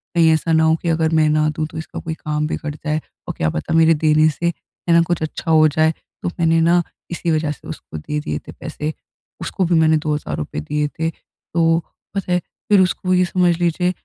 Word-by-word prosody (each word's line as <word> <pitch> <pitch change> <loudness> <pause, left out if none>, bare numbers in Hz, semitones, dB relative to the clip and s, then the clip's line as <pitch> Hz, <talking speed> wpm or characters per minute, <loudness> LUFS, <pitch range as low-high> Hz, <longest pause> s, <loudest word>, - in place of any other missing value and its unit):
कहीं 165 -1 +5
ऐसा 160 +1 0
ना 160 0 +4
हो 160 0 +4
कि 170 - -1
अगर 160 -1 +2
मैं 155 - +4
ना 155 0 +2
दूँ 155 +1 -2
तो 160 - -8
इसका 160 - -6
कोई 160 - -4
काम 150 -1 -2
बिगड़ 155 -1 -4
जाए 150 +1 -2 0.3
और - - -3
क्या 80 - +1
पता 75 - -3
मेरे 165 0 +6
देने 155 0 +4
से 155 +3 -4
है 170 0 -3
ना, 170 - +6
कुछ 170 0 -1
अच्छा 155 +1 -3
हो 155 -1 +6
जाए। 155 +1 +2
तो 165 - -8
मैंने 165 -1 +3
ना 170 +2 +4 0.3
इसी 170 0 -1
वजह 155 -1 +1
से 150 - -10
उसको - - -8
दे 150 - -3
दिए 75 - -3
थे - - -7
पैसे। 150 +1 -5 0.5
उसको 190 - -1
भी 170 0 +2
मैंने 160 0 +4
₹2,000 150 - -3
दिए 150 - -1
थे। 160 0 +1
तो 165 0 -1 0.4
पता 195 -2 -2
है 180 - +3 0.3
फिर 205 -2 +6
उसको 185 0 +1
ये 180 0 +4
समझ 175 -1 +2
लीजिए। 175 +1 +1
160 Hz, 220 wpm, -20 LUFS, 155-170 Hz, 0.5 s, मेरे